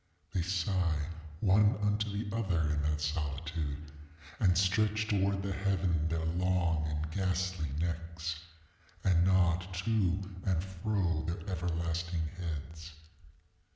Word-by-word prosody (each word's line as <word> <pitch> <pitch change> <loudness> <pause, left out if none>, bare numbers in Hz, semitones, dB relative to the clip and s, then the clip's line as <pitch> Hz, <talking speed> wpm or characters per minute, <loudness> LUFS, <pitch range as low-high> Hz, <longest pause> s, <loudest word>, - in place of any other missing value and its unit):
They 90 - +1
sigh 85 -3 0 0.3
one 105 +1 +5
unto 105 0 +1
the 105 +1 -3
other 100 -7 +1
in 75 -1 +1
that 75 0 0
solitude, 75 0 -3 0.5
and 90 -3 +4
stretch 105 +3 +2
towards 100 -2 +1
the 100 - -2
heaven 90 -5 +1
their 80 0 -1
long 85 -2 +1
and 75 +1 -2
ghastly 95 -3 0
necks, 85 0 -2 0.6
and 85 -2 +4
nod 90 -1 +3
to 95 -1 0
and 90 -3 +1
fro 95 -3 0
their 85 +4 -4
everlasting 85 -2 -1
heads. 80 -2 -6
90 Hz, 120 wpm, -32 LUFS, 80-95 Hz, 0.6 s, one